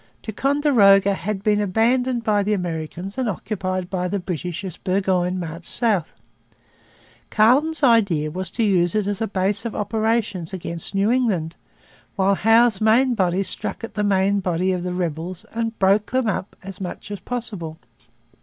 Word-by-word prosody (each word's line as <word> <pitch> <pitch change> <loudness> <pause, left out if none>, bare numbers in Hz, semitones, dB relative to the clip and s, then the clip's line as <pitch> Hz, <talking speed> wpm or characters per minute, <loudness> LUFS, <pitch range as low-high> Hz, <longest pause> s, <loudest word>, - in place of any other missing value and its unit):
Ticonderoga 220 -6 +3
had 195 +1 -4
been 210 -1 +2
abandoned 235 +5 +1
by 210 -2 +2
the 210 +1 0
Americans 175 +4 -5
and 250 -3 0
occupied 185 -1 -3
by 180 -1 -2
the 200 - -1
British 180 -1 -4
as 185 -4 -5
Burgoyne 185 -1 0
marched 170 0 -6
south. 210 -9 0 1.1
Carleton's 285 +9 +3
idea 200 - +3
was 185 +2 -4
to 230 - -1
use 180 -4 +2
it 210 -2 +1
as 205 0 -3
a 225 - 0
base 200 +2 +1
of 230 -3 -5
operations 210 -4 -1
against 170 0 -5
New 200 +3 +2
England, 195 -10 0 0.6
while 195 0 +2
Howe's 225 +1 +3
main 240 +4 +4
body 190 -3 +1
struck 195 - -4
at 230 - -6
the 210 - -1
main 200 0 +2
body 185 0 0
of 180 -1 -1
the 180 0 -3
rebels 170 +1 -4
and 225 0 -3
broke 200 +2 +2
them 255 0 0
up 200 -1 -3
as 195 +1 -9
much 185 +2 -6
as 205 - -5
possible. 200 -9 -5
195 Hz, 165 wpm, -22 LUFS, 180-225 Hz, 1.1 s, main